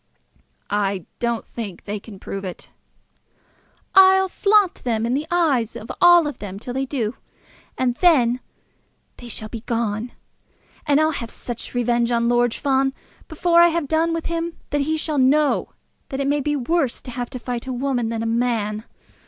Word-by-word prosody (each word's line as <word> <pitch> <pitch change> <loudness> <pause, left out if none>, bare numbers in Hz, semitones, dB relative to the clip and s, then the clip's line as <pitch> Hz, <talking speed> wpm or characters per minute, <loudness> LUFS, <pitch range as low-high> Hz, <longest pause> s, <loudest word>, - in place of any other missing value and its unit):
"I 200 -3 0
don't 235 -2 -1
think 210 -6 -7
they 210 0 -4
can 200 -1 -12
prove 195 +1 -6
it." 185 -2 -8 1.2
"I'll 380 0 +6
flaunt 405 -1 +2
them 230 -2 0
in 235 - 0
the 295 +4 -1
eyes 285 -10 +1
of 220 - -7
all 345 -2 +7
of 295 - -5
them 195 -2 -6
till 245 +4 -6
they 265 +1 -2
do; 250 -4 -2 0.6
and 255 -1 +1
then 255 -9 +4 0.8
they 245 - -10
shall 215 -1 -5
be 230 - -6
gone. 230 0 -2 0.7
And 290 0 +4
I'll 310 0 +3
have 235 -6 -5
such 240 +1 -7
revenge 240 -1 +1
on 235 0 +2
Lord 240 -1 +2
Fawn 270 -1 +1 0.3
before 340 +1 +3
I 345 - +8
have 335 -3 -1
done 320 +3 +1
with 330 -1 -2
him, 335 0 -3
that 290 - +1
he 315 +3 0
shall 305 -2 -2
know 285 +3 +3 0.4
that 270 - -4
it 275 - 0
may 290 +1 +1
be 295 +2 0
worse 280 0 0
to 250 - -8
have 245 0 -4
to - - -6
fight 245 0 -5
a - - -2
woman 250 -2 -1
than 225 0 -2
a - - -2
man. 225 -2 -1
250 Hz, 180 wpm, -22 LUFS, 230-305 Hz, 1.2 s, I